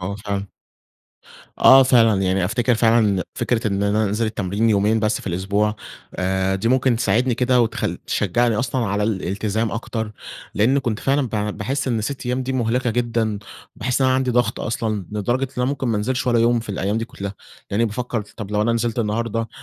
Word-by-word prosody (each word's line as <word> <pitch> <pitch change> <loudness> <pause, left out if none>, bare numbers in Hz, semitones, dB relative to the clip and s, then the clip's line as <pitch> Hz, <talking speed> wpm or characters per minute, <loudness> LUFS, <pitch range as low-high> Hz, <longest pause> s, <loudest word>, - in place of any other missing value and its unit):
آه 90 +2 -3
فعلًا. 100 -1 -4 1.1
آه 135 0 +8
فعلًا 115 -6 +4
يعني 95 0 +1
أفتكِر 120 +6 +1
فعلًا 115 0 +4
إن 100 -4 +2
فكرة 115 -2 -1
إن 100 -1 -1
أنا 105 +2 +2
أنزل 105 +3 0
التمرين 105 +1 0
يومين 105 +2 +2
بس 110 0 0
في - - -14
الأسبوع 100 +4 0 0.4
آآ 95 +1 0
دي 95 +4 -1
ممكن 130 -1 +3
تساعدني 120 +2 +1
كده 125 +1 +2
وتخ 115 -1 0 0.2
تشجعني 115 +4 +1
أصلًا 125 +1 -1
على 100 +1 -1
الإلتزام 105 +2 -1
أكتر 110 -1 -4 0.4
لأن 120 +7 +3
كنت 115 -6 -2
فعلًا 135 -1 +1
ب - - -17 0.3
باحس 135 +6 -2
إن 115 -3 0
6 130 +4 -4
أيّام 125 +1 -1
دي 130 +1 -3
مُهلِكة 125 0 0
جدًا، 115 -2 -1 0.4
باحس 125 +4 -1
إن 130 - +4
أنا 130 - +3
عندي 130 -1 0
ضغط 120 -1 +1
أصلًا 110 -4 -2
لدرجة 120 +6 0
إن 130 - -7
أنا - - +2
ممكن 130 -1 -1
ما 115 - +1
انزلش 125 +5 -1
والّا 120 -1 +3
يوم 120 +1 +3
في 115 - -11
الأيّام 100 +2 -1
دي 115 - -2
كلّها، 100 -3 -7 0.4
يعني 110 +4 +2
بافكر 120 +1 -3
طب 105 -3 -6
لو 105 0 +1
أنا 115 +2 +1
نزِلت 115 0 -1
النهارده 115 +1 -1
115 Hz, 195 wpm, -21 LUFS, 105-120 Hz, 1.1 s, آه